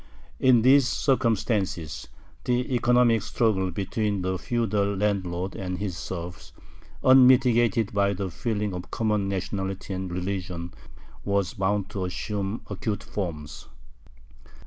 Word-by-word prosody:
In 125 -4 +5
these 135 0 +6
circumstances, 105 - 0 0.4
the 125 +1 0
economic 120 -2 +3
struggle 100 -5 0
between 100 +2 -2
the 95 0 -1
feudal 105 -4 0
landlord 95 -2 -1
and 90 -1 -4
his 100 -3 -3
serfs, 85 0 -7 0.5
unmitigated 125 -4 +5
by 100 0 +2
the 95 -1 -4
feeling 105 -1 -2
of 90 0 -6
common 105 -3 0
nationality 95 0 -3
and 95 -1 -4
religion, 90 -1 -4 0.5
was 100 -3 0
bound 100 +1 -1
to 95 -2 -3
assume 100 +3 -3
acute 105 +1 -3
forms. 75 -7 -5
100 Hz, 115 wpm, -26 LUFS, 95-115 Hz, 0.5 s, these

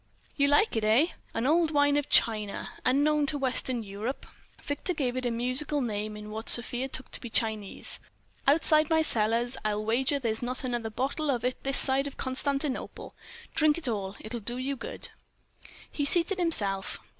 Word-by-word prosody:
"You 280 -1 +2
like 290 - +3
it, 220 - -1
eh? 230 +10 +4 0.3
An 230 - -1
old 325 +3 +3
wine 290 -1 +3
of 290 -1 -1
China, 215 -3 +1
unknown 290 +3 +2
to 290 - +2
Western 255 -3 +1
Europe." 210 +6 -5 0.4
Victor 295 +5 -3
gave 255 -5 -1
it 255 -1 -2
a - - +1
musical 255 +5 0
name 215 -4 -3
in 210 0 -9
what 220 +1 -5
Sofia 245 +2 +1
took 260 -1 -3
to - - -2
be 240 - -7
Chinese. 215 -3 -1 0.5
"Outside 310 +1 +4
my 320 -1 +3
cellars, 235 0 +3
I'll 215 0 -1
wager 260 +6 +2
there's 225 -5 -2
not 250 +2 -3
another 240 -3 -3
bottle 275 +7 -2
of 245 -3 -1
it 255 - -2
this 275 0 +4
side 270 +1 +4
of 280 - -9
Constantinople. 275 +1 -1 0.4
Drink 310 0 +3
it 335 - -3
all. 200 -3 -3
It 215 - -9
will 240 - -3
do 240 +4 -4
you 270 +2 -2
good." 485 - -4 0.8
He 290 - -3
seated 350 +5 +1
himself. 200 - +2
255 Hz, 180 wpm, -28 LUFS, 225-290 Hz, 0.8 s, eh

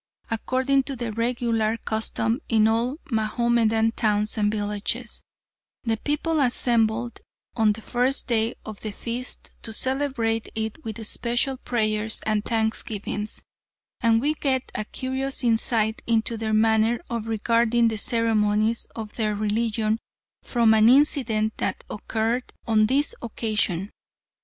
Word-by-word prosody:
According 260 +4 +1
to 275 - -4
the 235 -2 -4
regular 230 -1 0
custom 225 +2 -1
in 220 -2 +4
all 235 +5 +1
Mahomedan 225 0 +2
towns 210 -2 +1
and 210 -1 +1
villages, 210 +3 -3 0.6
the 225 -3 0
people 300 +5 -1
assembled 240 -2 +1 0.4
on 220 -2 +3
the 225 - -10
first 250 +4 0
day 230 -1 +1
of 215 -2 -7
the 215 - -5
feast 240 +4 -5
to 225 - -7
celebrate 255 -2 0
it 220 +7 -4
with 225 -1 -5
special 240 +4 +1
prayers 215 -3 0
and 215 -1 +1
thanksgivings, 220 -2 -2 0.6
and 230 -2 +3
we 295 +3 +1
get 265 -4 -1
a 215 - -3
curious 265 +3 -2
insight 225 -1 +1
into 230 0 +1
their 220 -1 -3
manner 220 +1 +3
of 230 -1 -3
regarding 230 +1 +2
the 220 -1 -1
ceremonies 220 -1 +1
of 220 -2 -6
their 215 -2 0
religion 215 +1 0 0.4
from 230 -3 +3
an 220 +1 +6
incident 240 -6 +3
that - - -2
occurred 225 +4 -2
on 215 -1 +3
this 280 +4 +1
occasion. 215 -5 -1
225 Hz, 130 wpm, -24 LUFS, 215-240 Hz, 0.6 s, an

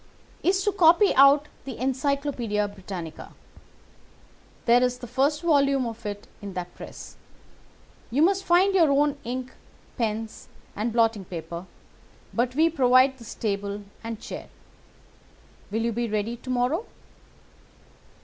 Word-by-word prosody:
"'Is 380 +2 +2
to 410 - +2
copy 365 +1 +5
out 280 +2 +6 0.2
the 265 -3 -6
Encyclopædia 260 -4 -1
Britannica. 180 -5 -8 1.3
There 240 +1 +5
is 250 0 +1
the 250 - -8
first 275 +6 0
volume 280 -5 +3
of 230 -1 -6
it 205 0 -6
in 200 -1 -7
that 180 -1 -5
press. - - -10 0.9
You 270 +6 +2
must 390 +2 +3
find 370 +3 +4
your 340 -5 +5
own 285 0 +2
ink, 255 +2 -5 0.5
pens, 220 -1 -3 0.3
and 220 +3 -1
blotting 225 -3 +2
paper, 170 +1 -7 0.7
but 245 +2 0
we 320 +3 +5
provide 260 -3 +4
this 230 -1 -9
table 205 -1 -3 0.2
and 225 -1 -5
chair. - - -8 1.2
Will 225 +3 -1
you 235 - 0
be 235 +1 -2
ready 215 +2 -1
to 245 +2 -11
morrow? 255 - 0
250 Hz, 130 wpm, -25 LUFS, 215-285 Hz, 1.3 s, out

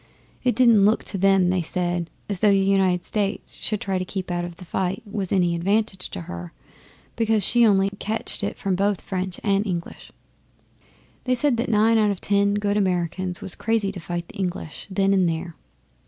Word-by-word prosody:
It 250 -1 +2
didn't 235 -5 +5
look 210 +2 +3
to 195 - -4
them, 195 -2 +4
they 185 -1 +1
said, 175 0 -2 0.2
as 200 -3 +1
though 210 - +4
the 200 - +4
United 190 -2 +2
States 205 -1 -3 0.2
trying 195 -2 -2
to - - -1
keep 185 0 -5
out 175 0 -1
of 175 -1 -6
the 180 - -11
fight 185 +2 -2
was 200 -3 -4
any 175 -3 +2
advantage 190 +2 0
to 90 - -6
her, 85 +1 -8 0.6
because 225 -2 +1
she 240 +4 +4
only 195 -1 +3
catched 220 0 -3
it 205 - -3
from 195 - -1
both 200 +1 +1
French 185 -1 -4
and 200 -1 +2
English. 175 -3 -5 1.1
They 255 0 +2
said 270 +1 +2
that 235 +2 -1
nine 220 +1 +4
out 210 -1 +3
of 200 -3 -2
ten 200 0 +2
good 205 0 0
Americans 180 -1 -1
was 185 - +3
crazy 225 -4 0
to 195 - -8
fight 170 0 -5
the - - -13
English 180 -4 -4
then 195 0 +2
and 185 -3 +3
there. 165 +1 -4
195 Hz, 195 wpm, -23 LUFS, 180-205 Hz, 1.1 s, didn't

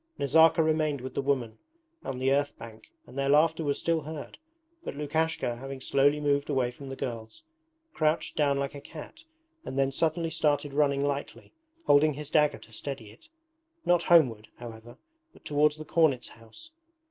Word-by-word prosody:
Nazarka 160 +3 +5
remained 155 -2 +1
with 130 +1 -7
the - - -1
women 125 -5 -1 0.4
on 130 - -4
the 130 +1 +1
earth 145 +1 0
bank 115 -1 -12
and - - -15
their 140 0 0
laughter 160 +3 +3
was 145 -2 0
still 165 -1 0
heard, 155 0 -8 0.4
but - - -6
Lukashka, 150 -4 -1
having 135 +2 -7
slowly 140 +3 +2
moved 145 -1 0
away 130 -4 +1
from 135 +2 -10
the 135 - -5
girls, 115 - -6 0.5
crouched 155 0 0
down 140 -2 +2
like 140 0 -2
a 140 - -9
cat 305 - -11 0.4
and 130 - -6
then 135 0 +2
suddenly 165 +3 0
started 145 -3 0
running 140 -1 +2
lightly, 140 0 -4 0.3
holding 145 +1 +4
his 150 0 -7
dagger 150 -1 +3
to 115 - -17
steady 115 -4 -6
it: 115 - -20 0.6
not 175 -1 +4
homeward, 130 -12 +3
however, 115 0 -10 0.4
but - - -21
towards 150 +1 +2
the 155 - -8
cornet's 150 -7 +2
house. 115 - -12
145 Hz, 170 wpm, -28 LUFS, 130-155 Hz, 0.6 s, Nazarka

